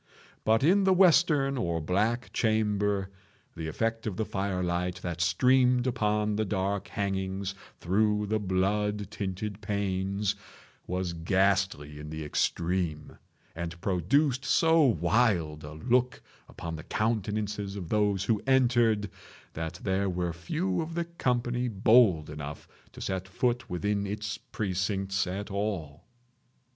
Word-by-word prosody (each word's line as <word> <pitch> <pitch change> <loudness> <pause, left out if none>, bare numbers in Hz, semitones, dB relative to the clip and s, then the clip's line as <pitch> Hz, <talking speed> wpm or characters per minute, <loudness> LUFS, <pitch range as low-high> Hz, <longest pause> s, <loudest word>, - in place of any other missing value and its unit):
But 110 +3 +3
in 190 +6 +5
the 190 0 +5
western 155 -7 +4
or 85 -7 -1
black 105 +9 0
chamber 105 -3 +1 0.4
the 80 -1 -5
effect 115 +7 -2
of 95 -4 -3
the 110 - 0
fire 95 -2 -2
light 90 +1 -1
that 85 -1 -3
streamed 125 +7 +3
upon 105 -4 0
the 110 - +1
dark 100 -1 -1
hangings 95 -1 -2 0.3
through 105 +3 +1
the 110 +1 0
blood 105 +1 0
tinted 100 0 -4
panes, 100 0 -1 0.5
was 90 -1 -2
ghastly 85 -4 +1
in 75 0 -7
the 80 0 -5
extreme, 85 0 -1 0.4
and 85 0 -5
produced 125 - +1
so 165 +4 +4
wild 90 - +2
a 75 +1 -8
look 125 +10 0 0.3
upon 85 -1 -6
the 80 - -8
countenances 105 -2 -2
of 90 -5 -6
those 105 -3 +1
who 105 0 +1
entered, 120 -5 +3 0.5
that 80 +2 -5
there 95 0 +1
were 90 -1 -2
few 90 +2 -2
of 165 +1 -5
the 170 0 -1
company 125 -6 -1
bold 105 -6 +4
enough 75 -1 -7 0.3
to - - -10
set 95 -1 -3
foot 120 +5 -1
within 100 +3 -1
its 105 0 -4
precincts 95 -1 -2
at 100 +3 -4
all. 95 -8 -3
100 Hz, 130 wpm, -29 LUFS, 90-110 Hz, 0.5 s, in